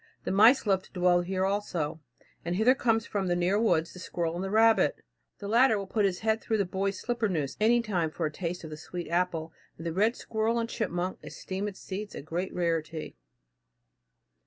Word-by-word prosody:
The - - -2
mice 220 +8 +6
love 195 -2 +2
to - - -20
dwell 180 -1 +3
here 185 +1 -1
also, 175 -6 -2 0.4
and 175 +1 -2
hither 220 +6 +5
comes 225 -4 +1
from 195 -2 -2
the 175 - +1
near 180 +4 +2
woods 170 -7 +1
the 180 - -10
squirrel 170 -2 -2
and 175 +2 -3
the 195 - -3
rabbit. 225 +2 +4 0.4
The 200 - -7
latter 235 +1 +4
will 200 - -4
put 210 +2 +1
his 185 -2 -1
head 220 0 +1
through 220 - 0
the 200 - +1
boy's 190 +1 -2
slipper 235 -3 -1
noose 150 -7 -2
any 235 +2 +4
time 180 -7 0
for 160 +1 -2
taste 175 +1 -4
of 160 - -8
the 155 - -6
sweet 175 +2 -7
apple, 170 -2 -1 0.2
and 165 - -9
the 165 - -2
red 215 +6 +2
squirrel 220 +1 -1
and 230 0 0
chipmunk 185 -5 -2
esteem 190 +2 -5
its 195 -2 -8
seeds 205 +2 -6
a - - -7
great 170 +5 -3
rarity. 165 -2 -2
190 Hz, 205 wpm, -29 LUFS, 175-220 Hz, 0.4 s, mice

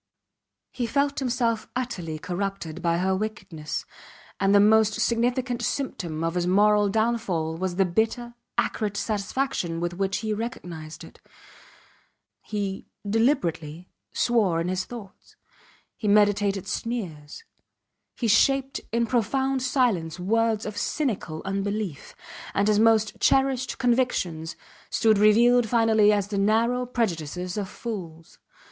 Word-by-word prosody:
He 245 -2 -3
felt 280 +2 0
himself 235 -4 0
utterly 200 -11 -3
corrupted 180 -1 -4
by 170 -1 +1
her 190 +2 +1
wickedness, 185 -7 -5 0.5
and 195 - +2
the - - +7
most 215 +1 +5
significant 245 +2 0
symptom 175 - -3
of 165 0 0
his 175 0 -1
moral 205 +2 +4
downfall 220 -7 0
was 185 0 -2
the 195 +1 +3
bitter, 225 +6 -1 0.2
acrid 205 -2 -1
satisfaction 205 -4 -2
with 175 0 -2
which 195 +2 -1
he 215 - 0
recognized 170 -9 -6
it. - - -15 1.2
He, 200 -2 -4 0.2
deliberately, 180 - 0 0.2
swore 210 -9 +2
in 170 +2 -1
his 185 0 -1
thoughts; 215 -6 -11 0.6
he 215 - -4
meditated 205 -1 +3
sneers; 185 - -5 0.7
he 235 - -1
shaped 270 +5 +3
in 235 +1 +1
profound 265 +3 0
silence 235 - 0
words 220 +3 +1
of 210 -1 -5
cynical 205 - -2
unbelief, 195 -4 -3 0.4
and 200 +1 +2
his 210 -1 +3
most 220 -1 +3
cherished 265 -2 +2
convictions 235 -11 0 0.3
stood 220 -3 +3
revealed 230 +3 +5
finally 220 -2 +4
as 205 -1 0
the 200 -2 -1
narrow 230 +5 +2
prejudices 180 - -2
of 200 -3 -3
fools. 170 -8 -7
210 Hz, 125 wpm, -25 LUFS, 180-235 Hz, 1.2 s, the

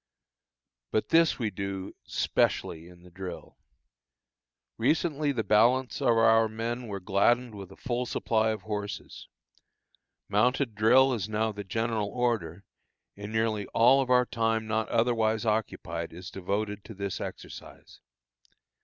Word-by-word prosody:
But 110 - -1
this 165 0 +4
we 110 -4 -2
do 95 0 -5
specially 80 +1 0
in 90 0 -16
the 90 - -16
drill. 90 -1 -8 1.2
Recently 150 +3 +1
the 115 -5 -1
balance 120 +7 +3
of 120 -4 +3
our 115 0 +5
men 115 +2 -4
were 100 -2 -4
gladdened 110 +6 +2
with 100 -2 -9
a - - -12
full 125 0 -3
supply 110 -2 +1
of 110 -3 -3
horses. 105 -1 -6 1.0
Mounted 125 +4 +1
drill 130 +5 +5
is 110 -4 -3
now 110 +1 0
the 105 -1 -7
general 110 +1 -1
order, 105 -8 -1 0.5
and 100 +1 -8
nearly 110 -2 0
all 130 +4 +6
our 125 0 +5
time 115 -2 0
not 110 0 -1
otherwise 115 -2 +1
occupied 90 -7 -2
is 90 +2 -9
devoted 100 +2 -3
to 110 - -10
this 100 0 -4
exercise. - - -9
110 Hz, 135 wpm, -28 LUFS, 100-120 Hz, 1.2 s, all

